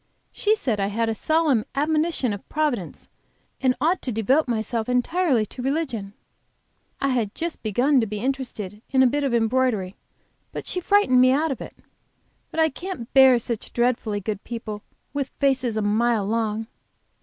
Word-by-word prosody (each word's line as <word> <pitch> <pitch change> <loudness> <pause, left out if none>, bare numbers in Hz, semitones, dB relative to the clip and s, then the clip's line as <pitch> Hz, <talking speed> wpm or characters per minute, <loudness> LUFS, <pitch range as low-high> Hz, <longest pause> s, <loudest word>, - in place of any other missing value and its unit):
She 425 +1 +2
said 240 - -1
I 195 - +1
had 225 +3 -1
a - - 0
solemn 300 -1 +2
admonition 305 -4 +1
of 200 - -9
Providence, 295 - -2 0.5
and 255 -1 +3
ought 345 +4 +1
to 255 - -3
devote 250 +8 +2
myself 225 0 -2
entirely 250 -1 +2
to 250 - -9
religion. 255 -8 -2 0.9
I 275 - +1
had 230 -5 -1
just 335 0 -4
begun 250 +6 +2
to 225 - -1
be 210 +1 -4
interested 225 -5 -4
in 265 -1 +4
a - - +6
bit 285 +4 +1
of 275 - 0
embroidery, 225 -4 +1 0.6
but - - -5
she 360 - -2
frightened 350 -10 +4
me 255 0 +6
out 300 +3 +1
of 265 - -4
it. - - -9 0.7
But - - -5
I 320 0 +4
can't 335 -6 -7
bear 265 -2 +7
such 235 -1 -3
dreadfully 235 -4 0
good 205 0 -4
people, 220 -3 -6 0.3
with 280 -2 -2
faces 260 -5 +1
a 215 - 0
mile 215 0 +2
long." 220 0 -1
250 Hz, 170 wpm, -24 LUFS, 220-280 Hz, 0.9 s, bear